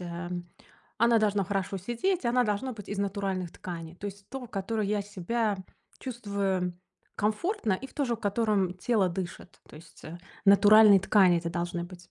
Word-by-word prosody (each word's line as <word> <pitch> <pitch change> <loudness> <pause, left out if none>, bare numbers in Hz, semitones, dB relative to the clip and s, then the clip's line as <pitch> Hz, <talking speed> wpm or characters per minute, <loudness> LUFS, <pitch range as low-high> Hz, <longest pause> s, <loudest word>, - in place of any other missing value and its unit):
эм, 175 0 -6 0.5
она 235 0 +5
должна 205 -2 +1
хорошо 195 0 -2
сидеть, 240 - -1
она 245 +1 +3
должна 210 +5 -1
быть 205 -3 -10
из 205 - -3
натуральных 195 -3 -2
тканей. 165 -2 -7
То 205 - -6
есть 200 0 -9
в - - -45
том, 265 -2 -6
в - - -25
которой 205 +1 -2
я 210 0 0
себя 205 +2 -1 0.4
чувствую 200 -7 -2 0.4
комфортно 215 - 0
и 250 +8 -3
в - - -21
тоже 265 -5 0
в - - -21
котором 205 -3 +1
тело 195 0 +1
дышит. 180 0 -7
То - - -14
есть, 160 - -15
э, 170 +2 -8 0.3
натуральные 205 0 +7
ткани 185 -3 +4
это 170 0 -3
должны 175 0 -3
быть. 175 -1 -13
200 Hz, 180 wpm, -28 LUFS, 180-220 Hz, 0.5 s, натуральные